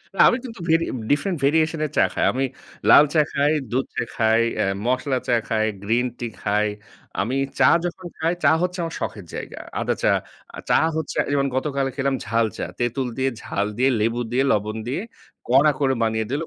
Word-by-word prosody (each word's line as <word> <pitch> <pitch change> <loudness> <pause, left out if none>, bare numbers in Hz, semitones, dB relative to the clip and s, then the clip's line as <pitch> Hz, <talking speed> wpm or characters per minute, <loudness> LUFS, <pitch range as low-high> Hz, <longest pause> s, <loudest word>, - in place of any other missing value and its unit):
না - - -10
আমি 235 - +3
কিন্তু 230 -6 -9
ভেরি 165 +1 +4
এ - - -6 0.2
different 175 +5 +1
variation 160 +2 +2
এর 150 - -5
চা - - +6
খাই। - - -1
আমি 135 +2 0 0.4
লাল 145 - +9
চা 155 - +5
খাই, 145 +1 +2 0.2
দুধ 130 +2 0
চা - - 0
খাই, 110 0 +3 0.2
অ্যা - - +1 0.2
মশলা 130 +1 +1
চা 120 - +3
খাই, 110 0 +1 0.2
গ্রিন 115 +4 +1
টি 120 - -3
খাই। 105 +1 +1 0.6
আমি 120 +6 -1 0.2
চা - - +6 0.2
যখন 175 +1 -5
খাই, 165 +2 +1
চা 140 - +6
হচ্ছে 180 +1 -1
আমার 165 -1 -4
শখের 105 -4 -4
জায়গা। - - -6 0.2
আদা - - 0
চা, - - +4 0.5
আ - - -6
চা - - +5 0.2
হচ্ছে 160 -2 -4
এই - - -3
যেমন 140 -1 +2
গতকাল 135 0 0
খেলাম 140 -1 0
ঝাল 115 +1 +2
চা। - - -3
তেঁতুল 120 +2 -1
দিয়ে, 130 0 +1
ঝাল 100 - -2
দিয়ে, 130 +2 +3
লেবু 115 +3 0
দিয়ে, 130 +2 +2
লবণ 105 0 0
দিয়ে 130 +8 -2 0.5
কড়া 135 +5 +5
করে 135 -2 +2
বানিয়ে 110 0 0
দিল 145 +3 -1
135 Hz, 205 wpm, -23 LUFS, 115-150 Hz, 0.6 s, লাল